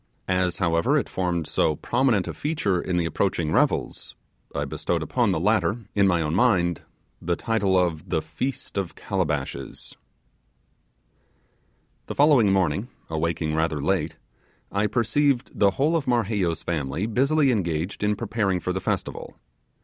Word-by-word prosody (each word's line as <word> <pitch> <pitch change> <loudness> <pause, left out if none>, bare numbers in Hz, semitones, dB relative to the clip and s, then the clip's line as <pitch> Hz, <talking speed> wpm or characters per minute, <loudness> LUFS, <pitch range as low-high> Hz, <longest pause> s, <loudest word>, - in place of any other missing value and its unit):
As, 90 -1 +1
however, 85 -2 +2
it - - 0
formed 90 -3 -1
so 75 - +1
prominent 120 - +1
a - - -4
feature 105 - -1
in 90 -1 -1
the 85 - +1
approaching 85 -1 0
revels, - - 0 0.4
I - - -1
bestowed - - -2
upon - - +1
the - - 0
latter, 100 +1 +2 0.2
in 100 -1 +4
my 85 -3 +2
own 75 0 -2
mind, 90 - +2 0.4
the 85 +1 0
title 100 -2 +1
of 85 -4 0
the - - +1
'Feast 100 +8 -4
of 95 -4 -4
Calabashes'. 80 -10 -3 2.1
The - - -5
following 140 -8 +5
morning, 95 +2 +1 0.2
awaking 80 0 -1
rather 80 -1 0
late, - - 0 0.6
I 100 +1 +1
perceived 120 +4 +1
the 100 - +4
whole 150 +5 +2
of 155 -5 -1
Marheyo's 105 -8 0
family 80 +2 -2
busily 135 +5 +2
engaged 90 -3 -2
in 105 0 +2
preparing 100 -3 -1
for 90 - -2
the 95 - -3
festival. - - -3
95 Hz, 145 wpm, -25 LUFS, 85-115 Hz, 2.1 s, following